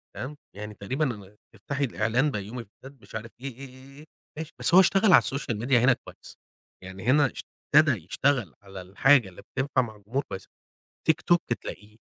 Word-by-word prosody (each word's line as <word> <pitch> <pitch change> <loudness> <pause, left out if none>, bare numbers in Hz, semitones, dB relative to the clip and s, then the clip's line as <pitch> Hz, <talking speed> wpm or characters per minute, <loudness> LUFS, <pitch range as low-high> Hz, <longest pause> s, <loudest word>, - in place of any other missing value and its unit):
تمام، 140 +4 -6 0.2
يعني 105 +1 -7
تقريبًا 105 -2 -4 0.2
تفتحي 140 +7 -4
الإعلان 125 +3 +1
بيومي 115 +2 -5
فؤاد 135 +5 -16
مش - - -14
عارف 110 +1 -6
إيه، 135 - -5
إيه، 135 +1 -10
إيه، 135 +2 -15
إيه 150 - -13 0.3
ماشي 160 0 -6
بس - - +4
هو 185 - +9
اشتغل 195 +1 +5
على - - +9
الsocial 135 -4 -2
media 130 +3 -1
هنا 125 +1 +6
كويس - - -13 0.5
يعني 95 0 -9
هنا 145 +4 +5
اش - - -8 0.3
ابتدى 140 - +5
يشتغل 125 - 0
على 95 -1 -10
الحاجة 110 +5 +3
اللي 90 - -13
بتنفع 135 0 -1
مع 110 -3 -6
الجمهور 110 +7 -3
كويسة، 95 - -7 0.6
tiktok 165 +2 +3 0.3
تلاقيه 105 +1 -9
125 Hz, 180 wpm, -26 LUFS, 105-140 Hz, 0.6 s, هو